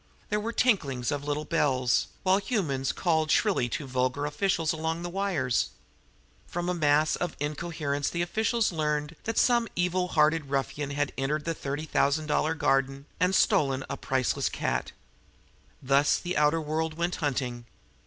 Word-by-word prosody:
There 210 - +1
were 225 +2 -3
tinklings 145 - +1
of 145 -1 -2
little 150 +1 -2
bells, 130 -7 +1 0.2
while 190 +1 +4
humans 160 - -1
called 160 -3 +1
shrilly 180 - +2
to 145 - -3
vulgar 130 +2 -1
officials 165 +1 0
along 160 +1 -2
the 175 - -4
wires. 175 -11 0 0.8
From 175 +1 -3
a - - +1
mass 155 -2 +3
of 175 -3 -3
incoherence 145 -1 -2
the 170 0 -1
officials 220 +5 +1
learned 150 -1 -1
that 225 - -2
some 240 -2 +4
evil 180 +1 +1
hearted 155 -2 +2
ruffian 140 +1 -2
had 140 +1 -1
entered 150 +3 -1
the 165 - 0
thirty 145 0 -4
thousand 155 0 +1
dollar 155 +1 +1
garden 135 -1 +1
and 180 +2 +2
had - - +5
stolen 135 -2 +2
a - - -1
priceless 130 -2 0
cat. - - -2 0.9
Thus 140 +2 +3
the 180 +1 -4
outer 150 +2 +3
world 155 +1 -2
went 170 +2 -1
hunting. 125 -5 -2
155 Hz, 160 wpm, -28 LUFS, 140-175 Hz, 0.9 s, had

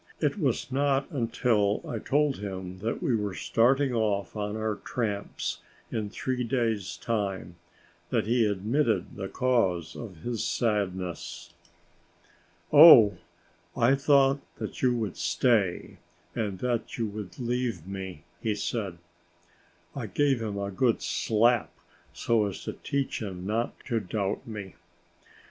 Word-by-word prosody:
It 150 +5 0
was 135 -4 0
not 135 0 +1
until 115 -5 +1
I 115 - -3
told 145 +3 +1
him 95 -2 -6
that 115 +4 -3
we 125 - +2
were 105 -3 -2
starting 130 +3 +2
off 105 -4 0
on 105 0 -3
our 110 -1 -1
tramps 105 -4 -3 0.3
in 105 -2 -2
three 125 +3 -2
days' 115 -8 -1
time, 95 -5 -2 0.5
that 115 -3 +1
he 115 0 +3
admitted 110 +6 0
the 95 -1 -4
cause 95 -10 +1
of 95 -9 -9
his 120 -3 -2
sadness. 90 -5 -2 1.2
"Oh, 135 -10 +9 0.6
I 120 +3 +4
thought 140 -1 +4 0.2
that - - -6
you 125 -1 +3
would 110 -6 -3
stay 90 +2 +1 0.4
and 105 -4 -2
that 120 -2 -2
you 115 - 0
would 100 -4 -7
leave 120 -7 -2
me," 95 -5 -7 0.2
he 110 -2 0
said. 100 -4 -3 1.0
I - - -4
gave 140 -4 +1
him 105 -2 -3
a 100 0 -3
good 115 +4 +1
slap, 115 +1 +2 0.4
so 110 -3 +1
as 95 - -6
to - - -4
teach 140 -3 -2
him 95 -4 -5
not 110 +4 -2
to 115 -3 -1
doubt 100 +1 -3
me. 105 -4 -7
110 Hz, 135 wpm, -28 LUFS, 100-125 Hz, 1.2 s, Oh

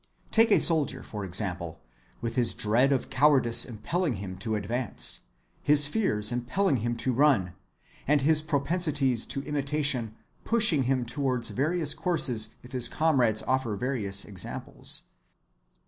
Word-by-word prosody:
Take 225 +1 +3
a 210 - +4
soldier, 160 -5 +4
for 105 -2 -7
example, 90 -3 -2 0.4
with 115 -1 -4
his 120 -3 +2
dread 120 +6 +2
of 135 - -2
cowardice 130 -4 +4
impelling 130 - -3
him 95 -2 -7
to 110 +4 -3
advance, 115 +3 0 0.4
his 145 0 +4
fears 145 - 0
impelling 130 +7 -1
him 120 +1 -3
to 130 +2 -1
run, 125 - +2 0.5
and 145 0 +2
his 155 +1 +3
propensities 145 -5 0
to 135 - -4
imitation 140 -6 -2 0.3
pushing 215 - +3
him 130 -1 0
towards 125 -1 -2
various 155 +2 -1
courses 120 - 0
if 125 - -14
his 125 -2 +5
comrades 125 -8 +1
offer 130 -4 -1
various 100 -4 -2
examples. 95 -3 -4
130 Hz, 135 wpm, -27 LUFS, 110-150 Hz, 0.5 s, his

